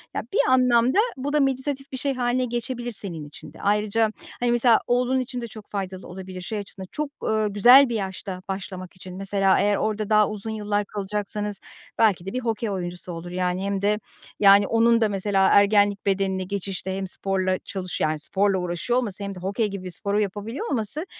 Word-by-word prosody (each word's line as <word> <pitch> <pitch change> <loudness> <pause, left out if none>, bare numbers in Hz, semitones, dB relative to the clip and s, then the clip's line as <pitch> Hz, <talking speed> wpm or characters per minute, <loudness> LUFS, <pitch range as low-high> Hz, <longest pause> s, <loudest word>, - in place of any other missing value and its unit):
Ya, - - 0
bir 435 - +2
anlamda 250 - +4 0.2
bu 280 +3 -3
da 300 - +3
meditatif 275 0 -1
bir 260 - -4
şey 275 +1 -1
hâline 250 0 0
geçebilir 240 0 -3
senin 180 -8 -5
için 145 - -11
de. - - -13
Ayrıca, 210 +2 +1 0.3
hani, 245 -1 +1
mesela, 240 -1 +5
oğlun 250 +2 +2
için 250 -1 -4
de 235 - -5
çok 215 -1 -12
faydalı 190 -2 -5
olabilir 185 0 -8
şey 210 +4 -4
açısından. 190 -2 -8
Çok, 300 -1 -3
eee, 215 -1 +1
güzel 245 +7 +7
bir 235 - -2
yaşta 190 -2 -4
başlamak 190 -1 -6
için. 185 0 -10
Mesela, 195 0 +2
eğer 205 0 +3
orada 215 0 -2
daha 210 -1 +4
uzun 215 +1 -5
yıllar 210 -1 -1
kalacaksanız 205 0 -2 0.4
belki 200 -6 +3
de 195 - -5
bir 255 - -1
hokey 230 -2 -2
oyuncusu 180 -2 -3
olur. 170 +1 -7
Yani 180 +1 -1
hem 200 -1 -1
de 210 +1 +1 0.4
yani, 200 0 +7
onun 230 0 +3
da 220 - +3
mesela 195 -1 +1
ergenlik 205 0 +4
bedenine 190 -1 0
geçişte 190 0 -3
hem 195 0 -3
sporla 185 0 0
çalış 185 -2 -4
yani, 155 0 +1
sporla 195 +4 +1
uğraşıyor 180 +7 -1
olması 205 -4 -2
hem 200 0 -5
de - - -8
hokey 200 +4 -1
gibi 200 -2 -6
bir - - -4
sporu 200 +3 0
yapabiliyor 210 - -4
olması, 260 - -1
205 Hz, 195 wpm, -24 LUFS, 190-235 Hz, 0.4 s, güzel